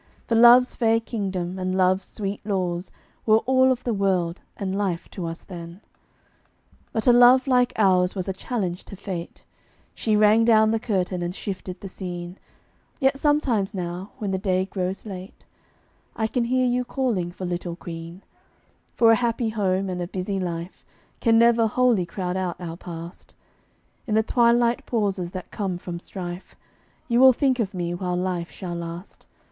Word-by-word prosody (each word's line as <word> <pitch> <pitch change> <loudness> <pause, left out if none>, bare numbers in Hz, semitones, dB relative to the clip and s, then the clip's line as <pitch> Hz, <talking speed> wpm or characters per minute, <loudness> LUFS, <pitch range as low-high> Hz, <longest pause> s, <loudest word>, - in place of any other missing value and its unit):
For - - -2
love's 240 +2 +7
fair 225 -1 +2
kingdom 190 -5 -4
and 185 0 -1
love's 185 0 +2
sweet 200 -1 -5
laws 185 -3 -2 0.4
Were 215 0 +6
all 260 0 +4
of 250 -1 -2
the 240 - -1
world 185 -4 0 0.2
and 195 -2 -3
life 190 -4 -2
to 175 -4 -5
us 165 0 -7
then. 170 -1 -9 1.1
But 220 - -2
a 245 - +6
love 245 +2 +7
like 250 -2 +3
ours 185 -3 +3
was 185 -1 -3
a 190 - -1
challenge 190 -3 -3
to - - -9
Fate; 185 -3 -7 0.5
She 215 -2 0
rang 215 +2 +5
down 220 -1 +5
the 225 - +1
curtain 185 -5 -1
and 175 +1 -3
shifted 185 -2 -6
the 195 - -6
scene; 180 -1 -7 0.6
Yet 270 -1 +2
sometimes 260 -10 +1
now, 180 +2 -4
when 210 -6 -3
the 190 - -1
day 185 -1 +1
grows 190 +1 -4
late, 190 -2 -9 0.7
I 220 - 0
can 235 +2 0
hear 255 +1 +2
you 250 0 +1
calling 240 -9 -1
for 185 +1 -7
Little 175 -1 -3
Queen; 170 +1 -9 0.7
For 230 -1 +6
a - - +6
happy 235 -1 0
home 195 -3 0
and 180 -1 -3
a 175 - -3
busy 190 +2 -3
life 170 0 -5 0.4
Can 225 -1 +4
never 235 -1 +5
wholly 230 -6 +2
crowd 180 +1 -3
out 185 -2 -2
our 165 -2 -6
past; 170 0 -10 0.7
In 215 - 0
the 220 - +4
twilight 235 0 +3
pauses 200 -6 -1
that 185 0 -8
come 190 -4 -3
from 175 -1 -6
strife, 180 0 -8 0.5
You 235 -1 +2
will 260 0 +8
think 260 0 +1
of 200 -4 -2
me 175 -1 -2
while 180 0 -2
life 180 -1 -2
shall 180 -3 -7
last. 170 +2 -8
195 Hz, 175 wpm, -24 LUFS, 180-230 Hz, 1.1 s, will